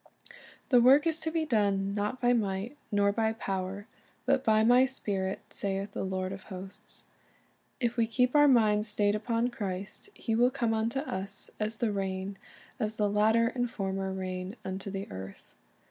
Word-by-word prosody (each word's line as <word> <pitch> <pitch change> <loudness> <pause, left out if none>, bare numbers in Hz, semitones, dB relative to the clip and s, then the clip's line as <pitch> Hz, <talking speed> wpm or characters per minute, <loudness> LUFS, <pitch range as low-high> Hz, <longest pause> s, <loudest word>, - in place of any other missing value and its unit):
The 245 -3 +6
work 270 +5 +6
is 325 -1 +1
to 320 - -2
be 320 -1 0
done, 200 -6 +1
"not 210 +5 -2
by 245 -1 +3
might, 205 +2 -1 0.2
nor 200 -1 +3
by 220 +1 0
power, 195 -2 -4 0.4
but 270 0 +2
by 220 0 +4
My 245 +3 +6
Spirit, 195 -7 -2
saith 195 0 -2
the - - -4
Lord 185 0 -2
of 195 0 -6
hosts."' 190 0 -9 0.8
If 240 -1 -1
we 230 -1 +3
keep 250 +4 +1
our 295 0 +7
minds 215 -5 +4
stayed 205 -1 +2
upon 230 +3 0
Christ, 200 - -5
He 225 - -3
will 240 +2 +4
come 245 -4 0
unto 230 +4 0
us 195 -7 -3
"as 215 +1 -2
the 230 -2 0
rain, 195 0 -3 0.4
as 215 -2 -1
the 205 -1 +1
latter 220 +3 +3
and 245 -1 -2
former 195 -2 -3
rain 185 +1 -4
unto 190 +1 -4
the 195 0 -5
earth." 95 +1 -9
210 Hz, 175 wpm, -30 LUFS, 195-240 Hz, 0.8 s, our